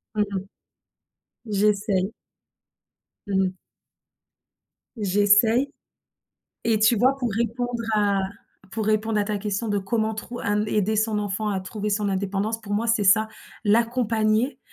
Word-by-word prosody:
Mmh 210 Hz, -, +3 dB
mh. 190 Hz, 0 st, -3 dB, 1.1 s
J'essaye. 200 Hz, -1 st, +1 dB, 1.2 s
Mmh 195 Hz, -1 st, +2 dB
mh. 185 Hz, -, -5 dB, 1.4 s
J'essaye. 205 Hz, +6 st, +3 dB, 0.9 s
Et 225 Hz, -2 st, +2 dB
tu 220 Hz, +2 st, +4 dB
vois 260 Hz, +5 st, +3 dB
pour 250 Hz, -4 st, -2 dB
répondre 235 Hz, +2 st, -2 dB
à 205 Hz, -2 st, +2 dB, 0.5 s
pour 220 Hz, -2 st, -3 dB
répondre 215 Hz, 0 st, +1 dB
à 205 Hz, -, +2 dB
ta 210 Hz, 0 st, -2 dB
question 210 Hz, +2 st, -2 dB
de 205 Hz, -1 st, +1 dB
comment 220 Hz, +3 st, -1 dB
trou 240 Hz, +3 st, -7 dB
hem, 205 Hz, +1 st, +1 dB
aider 210 Hz, +1 st, +1 dB
son 215 Hz, 0 st, +1 dB
enfant 205 Hz, +1 st, -2 dB
à 195 Hz, -, 0 dB
trouver 210 Hz, +2 st, -4 dB
son 205 Hz, -1 st, 0 dB
indépendance, 200 Hz, +3 st, -2 dB
pour 205 Hz, -2 st, -4 dB
moi 220 Hz, +3 st, 0 dB
c'est 225 Hz, -3 st, +2 dB
ça: 220 Hz, +3 st, +5 dB, 0.4 s
l'accompagner, 225 Hz, +2 st, +2 dB
215 Hz, 135 wpm, -24 LUFS, 205-225 Hz, 1.4 s, ça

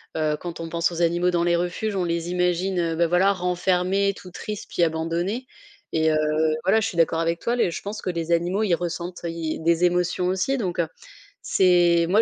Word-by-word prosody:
heu, 155 Hz, -1 st, 0 dB
quand 175 Hz, -1 st, -6 dB
on 165 Hz, -, -5 dB
pense 170 Hz, +1 st, 0 dB
aux 170 Hz, -, -3 dB
animaux 175 Hz, +1 st, +2 dB
dans 170 Hz, -1 st, +1 dB
les 170 Hz, 0 st, +2 dB
refuges, 180 Hz, +5 st, -2 dB
on 185 Hz, -2 st, 0 dB
les 170 Hz, 0 st, -2 dB
imagine, 180 Hz, +1 st, 0 dB
heu 165 Hz, -1 st, 0 dB
bah, 170 Hz, +1 st, +2 dB
voilà, 180 Hz, +4 st, +3 dB
renfermés, 180 Hz, +2 st, +1 dB
tout 180 Hz, -, -12 dB
triste 210 Hz, +3 st, -6 dB
puis -, -, -2 dB
abandonnés 170 Hz, +9 st, -1 dB, 0.5 s
et 160 Hz, 0 st, +2 dB
heu, -, -, +2 dB, 0.5 s
voilà. 195 Hz, +4 st, +4 dB
Je 220 Hz, -, 0 dB
suis -, -, -6 dB
d'accord 165 Hz, 0 st, +2 dB
avec 165 Hz, 0 st, 0 dB
toi, 235 Hz, +1 st, 0 dB
les 235 Hz, -, +2 dB
je -, -, -5 dB
pense 205 Hz, +2 st, -6 dB
que -, -, -3 dB
les 170 Hz, -1 st, -3 dB
animaux, 175 Hz, +5 st, +1 dB
ils 185 Hz, -5 st, +2 dB
ressentent, 175 Hz, +1 st, -5 dB
ils 165 Hz, -2 st, -3 dB
des 170 Hz, +1 st, +2 dB
émotions 180 Hz, 0 st, +1 dB
aussi 190 Hz, +9 st, 0 dB
donc 185 Hz, -8 st, -3 dB
heu, 165 Hz, -, +2 dB, 0.5 s
c'est 175 Hz, -2 st, +4 dB
moi 210 Hz, +4 st, +5 dB
175 Hz, 215 wpm, -24 LUFS, 170-185 Hz, 0.5 s, moi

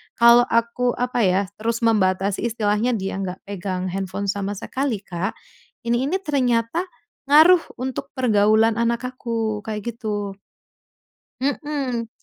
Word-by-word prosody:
kalau 235 Hz, +1 st, +7 dB
aku 235 Hz, +2 st, +1 dB
apa 245 Hz, -2 st, 0 dB
ya, 185 Hz, +1 st, +3 dB, 0.2 s
terus 230 Hz, +2 st, -1 dB
membatasi, 195 Hz, -2 st, +1 dB
istilahnya 220 Hz, +2 st, 0 dB
dia 195 Hz, -2 st, -3 dB
nggak 185 Hz, -1 st, -5 dB
pegang 185 Hz, -1 st, -3 dB
handphone 195 Hz, +1 st, -3 dB
sama 200 Hz, -1 st, -3 dB
sekali, 260 Hz, 0 st, -3 dB
Kak, 185 Hz, +2 st, -3 dB, 0.5 s
ini 240 Hz, +3 st, +1 dB
ini 380 Hz, +4 st, 0 dB
ternyata 260 Hz, +1 st, 0 dB, 0.4 s
ngaruh 315 Hz, +5 st, +7 dB, 0.2 s
untuk 265 Hz, +1 st, -4 dB
pergaulan 220 Hz, -2 st, +3 dB
anak 235 Hz, +1 st, 0 dB
aku, 225 Hz, -4 st, -2 dB
kayak 215 Hz, +1 st, -4 dB
gitu. 205 Hz, -3 st, -4 dB, 1.0 s
Mhm. 275 Hz, -4 st, -2 dB
230 Hz, 125 wpm, -22 LUFS, 200-250 Hz, 1.0 s, kalau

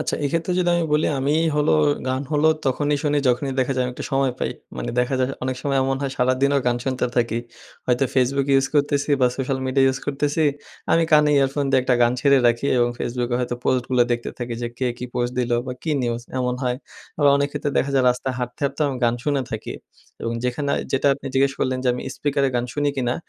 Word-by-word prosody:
আচ্ছা -, -, -1 dB
এক্ষেত্রে 165 Hz, +4 st, -1 dB
যদি 175 Hz, -1 st, +2 dB
আমি 170 Hz, -, +1 dB
বলি 150 Hz, +1 st, +3 dB
আমি 140 Hz, +2 st, +1 dB, 0.2 s
হলো, 150 Hz, +1 st, +2 dB, 0.4 s
গান 130 Hz, +1 st, -1 dB
হলো 150 Hz, +1 st, +3 dB, 0.2 s
তখনই 145 Hz, +3 st, +1 dB
শুনি 145 Hz, -1 st, +1 dB
যখনই 125 Hz, +2 st, 0 dB
দেখা 130 Hz, +1 st, 0 dB
যায় 130 Hz, -, +1 dB
আমি 125 Hz, -, -3 dB
একটু -, -, -6 dB
সময় 135 Hz, -1 st, +2 dB
পাই। -, -, -1 dB, 0.3 s
মানে -, -, -3 dB
দেখা 125 Hz, +2 st, +1 dB
যায় 130 Hz, +1 st, +1 dB
অনেক 130 Hz, -1 st, -2 dB
সময় 140 Hz, -1 st, 0 dB
এমন 135 Hz, 0 st, 0 dB
হয় 140 Hz, -, -1 dB
সারাদিনও 130 Hz, +3 st, +2 dB
গান 120 Hz, -1 st, +2 dB
শুনতে 130 Hz, -2 st, 0 dB
থাকি। 115 Hz, -1 st, +1 dB, 0.5 s
হয়তো 125 Hz, +1 st, +2 dB
Facebook 135 Hz, +1 st, +2 dB
ইউজ 135 Hz, 0 st, +4 dB
করতেছি 145 Hz, 0 st, +1 dB
বা 125 Hz, -, +5 dB
সোশ্যাল 135 Hz, 0 st, -1 dB
মিডিয়া 135 Hz, +1 st, +3 dB
ইউজ 130 Hz, 0 st, +1 dB
করতেছি 145 Hz, +2 st, 0 dB, 0.5 s
আমি 165 Hz, -, +4 dB
কানে 150 Hz, -1 st, +6 dB
ইয়ারফোন 140 Hz, +1 st, +1 dB
দিয়ে 135 Hz, -1 st, +4 dB
একটা 125 Hz, 0 st, +2 dB
গান 120 Hz, 0 st, +4 dB
ছেড়ে 140 Hz, +1 st, +5 dB
রাখি 120 Hz, +3 st, +2 dB
এবং 120 Hz, 0 st, +3 dB
Facebook 120 Hz, 0 st, -2 dB
এ -, -, +2 dB
হয়তো 125 Hz, 0 st, -2 dB
পোস্টগুলো 125 Hz, 0 st, +2 dB
দেখতে 120 Hz, 0 st, -3 dB
থাকি 120 Hz, -1 st, -4 dB
যে, -, -, -1 dB
কে 130 Hz, -, 0 dB
কী -, -, -5 dB
পোস্ট 120 Hz, 0 st, -1 dB
দিলো 120 Hz, -1 st, +1 dB
বা 130 Hz, -, -3 dB
কী 160 Hz, -, -2 dB
নিউজ 120 Hz, 0 st, -1 dB, 0.2 s
এমন 125 Hz, 0 st, 0 dB
হয়। 125 Hz, -1 st, 0 dB, 0.4 s
আবার 145 Hz, -1 st, +5 dB
অনেক 140 Hz, 0 st, +1 dB
ক্ষেত্রে 145 Hz, -, -2 dB
দেখা 140 Hz, -, 0 dB
যায় 130 Hz, -2 st, +3 dB
রাস্তায় 125 Hz, +1 st, -3 dB
হাঁটতে, 125 Hz, 0 st, -5 dB
হাঁটতেও 140 Hz, +2 st, 0 dB
আমি 135 Hz, -, -3 dB
গান 115 Hz, -, +3 dB
শুনে 145 Hz, -2 st, +1 dB
থাকি 110 Hz, -, -5 dB, 0.5 s
এবং 115 Hz, -, -2 dB
যেখানে 140 Hz, +3 st, -1 dB, 0.2 s
যেটা 135 Hz, +2 st, +1 dB
আপনি 140 Hz, -, -10 dB
জিজ্ঞেস 135 Hz, +1 st, +3 dB
করলেন 130 Hz, 0 st, 0 dB
যে, -, -, +2 dB
আমি 125 Hz, -, -5 dB
স্পিকারে 140 Hz, -1 st, +1 dB
গান 120 Hz, -, +1 dB
শুনি 145 Hz, 0 st, 0 dB
কিনা? 125 Hz, -2 st, 0 dB
135 Hz, 225 wpm, -22 LUFS, 125-140 Hz, 0.5 s, কানে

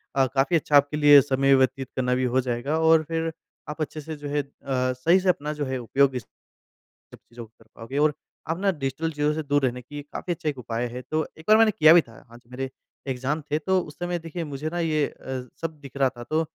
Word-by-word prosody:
अ, 135 Hz, -, +4 dB
काफ़ी 140 Hz, +5 st, +2 dB
अच्छा 150 Hz, -2 st, +1 dB
आपके 145 Hz, +1 st, +2 dB
लिए 145 Hz, -2 st, +8 dB
समय 135 Hz, 0 st, +2 dB
व्यतीत 130 Hz, 0 st, +1 dB
करना 125 Hz, -1 st, 0 dB
भी 130 Hz, -, 0 dB
हो 130 Hz, -, +4 dB
जाएगा 125 Hz, +5 st, -2 dB
और 160 Hz, 0 st, +5 dB
फिर 165 Hz, +1 st, -2 dB, 0.4 s
आप 150 Hz, +1 st, -6 dB
अच्छे 155 Hz, +1 st, -4 dB
से, 155 Hz, +1 st, -7 dB
जो 145 Hz, 0 st, -8 dB
है 145 Hz, 0 st, 0 dB
अ, -, -, -13 dB, 0.5 s
सही 165 Hz, +9 st, +3 dB
से 185 Hz, 0 st, 0 dB
अपना 150 Hz, -3 st, 0 dB
जो 145 Hz, -1 st, -3 dB
है, 130 Hz, 0 st, -2 dB
उपयोग 135 Hz, +3 st, +2 dB
भी 125 Hz, -, -3 dB
स 115 Hz, -, -14 dB, 0.9 s
सब -, -, -11 dB
चीज़ों 120 Hz, 0 st, -12 dB
को 110 Hz, -, -24 dB
कर -, -, -20 dB
पाओगे। 115 Hz, +5 st, -7 dB
और 150 Hz, +1 st, +3 dB, 0.4 s
आप 165 Hz, +3 st, -1 dB
ना, 200 Hz, 0 st, +2 dB
डिजिटल 150 Hz, +1 st, -3 dB
चीज़ों 150 Hz, 0 st, 0 dB
से 160 Hz, 0 st, -3 dB
दूर 145 Hz, 0 st, +1 dB
रहने 125 Hz, 0 st, -2 dB
की 145 Hz, +4 st, -8 dB
काफ़ी 175 Hz, -, -3 dB
अच्छा 160 Hz, -2 st, -3 dB
एक 140 Hz, -, -5 dB
उपाय 120 Hz, 0 st, -3 dB
है। 125 Hz, +1 st, -6 dB
तो 155 Hz, +4 st, -1 dB
एक 160 Hz, -, -14 dB
बार 215 Hz, 0 st, +7 dB
मैंने 225 Hz, -1 st, +5 dB
किया 155 Hz, -3 st, +6 dB
भी 175 Hz, -, +7 dB
था। 115 Hz, -, -18 dB, 0.2 s
हाँ, 120 Hz, -, -13 dB
जब 120 Hz, 0 st, -23 dB
मेरे 135 Hz, +1 st, -4 dB, 0.4 s
एग्ज़ाम 135 Hz, +4 st, -2 dB
थे, 150 Hz, -, +2 dB
तो 190 Hz, +4 st, +1 dB
उस 150 Hz, -, -10 dB
समय, 175 Hz, 0 st, -2 dB
देखिए, 165 Hz, +1 st, -6 dB
मुझे 145 Hz, +1 st, -4 dB
ना 175 Hz, +2 st, -4 dB
ये 155 Hz, -3 st, +1 dB
अ, 130 Hz, -1 st, -7 dB, 0.2 s
सब 160 Hz, -2 st, -5 dB
दिख 140 Hz, -1 st, -11 dB
रहा 135 Hz, -1 st, +3 dB
था। 120 Hz, -, -7 dB
तो 155 Hz, +5 st, 0 dB
145 Hz, 260 wpm, -25 LUFS, 130-160 Hz, 0.9 s, लिए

